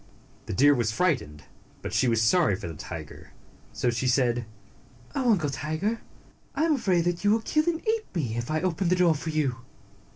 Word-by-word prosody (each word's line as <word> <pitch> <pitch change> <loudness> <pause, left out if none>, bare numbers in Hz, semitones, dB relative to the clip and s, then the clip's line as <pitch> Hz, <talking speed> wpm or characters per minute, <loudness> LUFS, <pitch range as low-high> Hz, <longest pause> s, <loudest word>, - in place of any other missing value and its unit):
The - - -3
deer 145 +8 +5
was 120 -5 0
frightened, 115 - -1 0.4
but - - -5
she 130 - +2
was 115 -2 +2
sorry 135 - +3
for 95 -2 -7
the 85 - -6
tiger, 75 - -9 0.4
so 125 - 0
she 120 +2 -1
said, 120 -2 +1 0.7
"Oh, 255 -3 +2
Uncle 155 -8 0
Tiger! 160 +11 -2 0.5
I 290 - +1
am 325 -1 +3
afraid 190 - +2
that 175 +1 -1
you 205 - +3
will 220 +2 +3
kill 305 +5 +1
me 345 - +3
and 325 - -8
eat 440 0 +1
me 125 -10 -1
if 120 0 -4
I 155 0 0
open 185 0 0
the 180 - +4
door 180 -2 +4
for 155 +2 -5
you." 150 -6 0
155 Hz, 205 wpm, -26 LUFS, 120-190 Hz, 0.7 s, deer